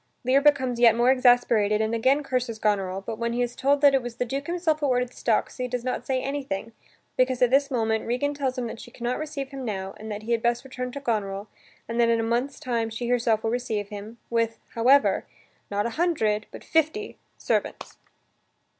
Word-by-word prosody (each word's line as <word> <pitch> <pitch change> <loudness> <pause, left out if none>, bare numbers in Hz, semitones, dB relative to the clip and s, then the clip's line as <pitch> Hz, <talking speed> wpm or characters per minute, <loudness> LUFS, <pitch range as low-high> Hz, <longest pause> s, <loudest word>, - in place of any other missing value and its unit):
Lear 260 +3 +4
becomes 265 -4 +3
yet 235 -2 +6
more 240 +2 +4
exasperated 245 -5 +4
and 220 +1 0
again 260 +6 +2
curses 250 -4 -2
Goneril, 195 -3 0
but 220 +2 -6
when 235 0 -1
he 245 +1 +1
is 245 0 -4
told 280 +1 +2
that 285 -1 +6
it 270 - +3
was 240 -1 -7
the 250 - -1
Duke 275 +4 -4
himself 340 -3 0
who 290 - 0
ordered 250 -1 +1
the - - -21
stocks, 225 -3 0
he 250 -1 -2
does 250 -1 -3
not 255 - -3
say 260 -1 0
anything, 265 -6 -3 0.4
because, 255 0 +2
at 250 -1 +3
this 275 +1 +4
moment, 220 -4 0
Regan 255 +5 0
tells 270 -2 -2
him 250 - -2
that 225 - -6
she - - -10
can 240 - -12
not 245 +1 -1
receive 290 -3 -5
him 275 -1 -7
now 195 -4 -4
and 220 0 -8
that 210 +1 -5
he 230 - -4
had 230 -1 +2
best 235 0 +1
return 255 -1 -5
to 280 - -5
Goneril, 210 -5 -2 0.4
and 230 +1 -3
that 230 - +4
in 230 0 +3
a - - 0
month's 240 +5 -1
time 235 -5 -1
she 235 +2 -4
herself 230 -3 +2
will 225 - 0
receive 220 -4 -2
him, 210 +3 -8
with, 230 -1 0 0.2
however, 260 +5 +4 0.4
not 205 0 -1
a 235 - -1
hundred 215 -12 +1
but - - -11
fifty 325 +7 0 0.2
servants. - - -2
245 Hz, 225 wpm, -25 LUFS, 225-270 Hz, 0.4 s, yet